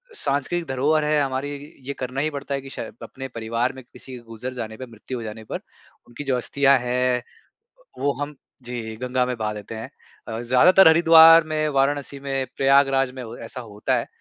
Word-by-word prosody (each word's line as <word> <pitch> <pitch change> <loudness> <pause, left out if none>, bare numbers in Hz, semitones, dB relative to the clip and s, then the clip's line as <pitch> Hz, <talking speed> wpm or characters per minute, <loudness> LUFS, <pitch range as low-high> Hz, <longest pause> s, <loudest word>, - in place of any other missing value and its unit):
सांस्कृतिक 155 - -1
धरोहर 145 +4 +1
है 150 0 +2
हमारी 135 +1 -2 0.4
ये 140 - -2
करना 130 +1 -3
ही 155 - 0
पड़ता 140 -1 -5
है 135 - -4
कि 135 - -10
शाय 115 - -6
अपने 135 0 -7
परिवार 115 +1 -2
में 130 0 -11
किसी 125 +1 -12
गुज़र 115 +3 -6
जाने 110 -3 -6
पे 130 - -7
मृत्यु 120 +2 -8
हो 115 - -6
जाने 110 0 -7
पर - - -5 0.5
उनकी 120 +4 -8
जो 135 -3 0
अस्थियाँ 140 +2 +3
हैं 125 0 0 0.8
वो 140 0 +1
हम 145 +1 -4 0.3
जी, 115 -2 -5
गंगा 125 +1 0
में 125 -1 -3
बहा 110 -1 -2
देते 105 +2 -8
हैं। 110 - -7 0.4
अ, 110 0 -4
ज़्यादातर 160 +10 +6
हरिद्वार 165 0 +8
में, 155 -1 -1
वाराणसी 140 0 0
में, 135 -1 -2
प्रयागराज 135 -1 +3
में 130 - -8
हो 115 0 -8
ऐसा 130 - -8
होता 105 -3 -2
है। - - -2
130 Hz, 195 wpm, -23 LUFS, 120-140 Hz, 0.8 s, हरिद्वार